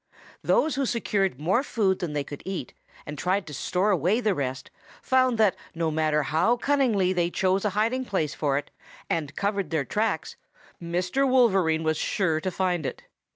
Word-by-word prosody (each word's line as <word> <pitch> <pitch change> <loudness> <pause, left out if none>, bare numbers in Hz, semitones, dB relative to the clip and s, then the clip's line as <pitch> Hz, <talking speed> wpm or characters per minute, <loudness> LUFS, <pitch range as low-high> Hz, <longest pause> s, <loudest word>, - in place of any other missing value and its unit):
"Those 315 - +2
who 270 -1 0
secured 195 - 0
more 185 - +2
food 205 -9 0
than 175 -5 -3
they 145 -1 -1
could 145 0 -9
eat 190 -10 -5 0.3
and 150 0 -7
tried 185 +2 0
to 150 - -9
store 185 +8 0
away 185 - +2
the 215 -4 +1
rest 130 -5 -4 0.3
found 255 -2 +3
that 215 -4 +3 0.2
no 165 -1 0
matter 155 -1 +1
how 165 - +2
cunningly 240 -9 +2
they 175 -1 +1
chose 190 +2 +1
a - - +3
hiding 235 +5 +1
place 160 - -1
for 140 -3 0
it 145 - -5 0.4
and 155 -3 -2
covered 200 -4 -1
their 155 -4 -1
tracks, 210 - -2 0.4
Mr. 180 +11 0
Wolverine 190 -11 +3
was 155 -1 +1
sure 160 -4 0
to 185 - -1
find 180 -2 -1
it. - - -5
185 Hz, 180 wpm, -26 LUFS, 160-215 Hz, 0.4 s, found